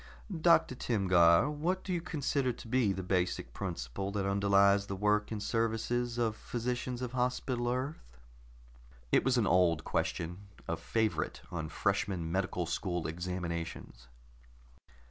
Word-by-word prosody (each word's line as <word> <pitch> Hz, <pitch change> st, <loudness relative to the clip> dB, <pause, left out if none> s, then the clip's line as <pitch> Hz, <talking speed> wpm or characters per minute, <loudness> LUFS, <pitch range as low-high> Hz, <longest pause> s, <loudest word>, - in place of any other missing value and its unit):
"Doctor 170 Hz, -5 st, +5 dB
Timgar, 95 Hz, -6 st, +4 dB
what 170 Hz, +6 st, -1 dB
do 185 Hz, -, -3 dB
you 175 Hz, -, -1 dB
consider 145 Hz, -6 st, 0 dB
to 120 Hz, -, -10 dB
be 115 Hz, -3 st, +2 dB
the 95 Hz, 0 st, -3 dB
basic 90 Hz, -9 st, -1 dB
principle 90 Hz, 0 st, -4 dB
that 100 Hz, -2 st, -1 dB
underlies 100 Hz, 0 st, +4 dB
the 100 Hz, -, -3 dB
work 105 Hz, +1 st, +1 dB
and 105 Hz, -2 st, -3 dB
services 115 Hz, +2 st, 0 dB
of 115 Hz, -3 st, +1 dB
physicians 125 Hz, +2 st, -3 dB
of 125 Hz, -, -3 dB
Hospital 125 Hz, -1 st, -1 dB
Earth?" 130 Hz, -, -4 dB, 0.9 s
It -, -, +4 dB
was 130 Hz, -1 st, +2 dB
an 115 Hz, -, +3 dB
old 85 Hz, -3 st, +3 dB
question, 85 Hz, +3 st, -2 dB, 0.3 s
a 85 Hz, -, 0 dB
favorite 110 Hz, +6 st, -1 dB
on 80 Hz, -3 st, -4 dB
freshman 95 Hz, -3 st, -1 dB
medical 90 Hz, -1 st, -1 dB
school 85 Hz, 0 st, -2 dB
examinations. 85 Hz, -6 st, -5 dB
100 Hz, 135 wpm, -32 LUFS, 90-120 Hz, 0.9 s, Doctor